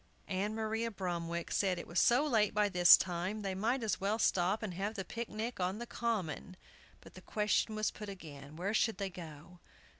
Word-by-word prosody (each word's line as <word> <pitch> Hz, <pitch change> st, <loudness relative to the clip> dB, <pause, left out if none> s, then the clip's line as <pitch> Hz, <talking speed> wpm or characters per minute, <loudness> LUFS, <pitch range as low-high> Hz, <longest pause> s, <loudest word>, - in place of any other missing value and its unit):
Ann 200 Hz, +3 st, -1 dB
Maria 225 Hz, +1 st, -1 dB
Bromwick 170 Hz, -4 st, -3 dB
said 190 Hz, -3 st, +1 dB
it 170 Hz, -, -6 dB
was 170 Hz, -, 0 dB
so 245 Hz, +5 st, +4 dB
late 220 Hz, -8 st, +2 dB
by 210 Hz, -1 st, +3 dB
this 180 Hz, -2 st, +8 dB
time, 185 Hz, +4 st, -3 dB
they 195 Hz, -1 st, -2 dB
might 230 Hz, +6 st, 0 dB
as 215 Hz, -4 st, -1 dB
well 205 Hz, +3 st, +1 dB
stop 195 Hz, -1 st, +1 dB
and 200 Hz, -4 st, -3 dB
have 200 Hz, +5 st, -3 dB
the 195 Hz, -3 st, -4 dB
picnic 230 Hz, 0 st, -5 dB
on 185 Hz, +2 st, -1 dB
the 240 Hz, -, -5 dB
Common! 200 Hz, -6 st, -3 dB, 0.4 s
But -, -, -15 dB
the -, -, -12 dB
question 210 Hz, +1 st, 0 dB
was 215 Hz, 0 st, 0 dB
put 210 Hz, -1 st, -8 dB
again, 150 Hz, -6 st, -10 dB
Where 190 Hz, +5 st, -2 dB
should 225 Hz, 0 st, +2 dB
they 195 Hz, -2 st, -3 dB
go? 170 Hz, 0 st, -11 dB
200 Hz, 200 wpm, -34 LUFS, 180-220 Hz, 0.4 s, this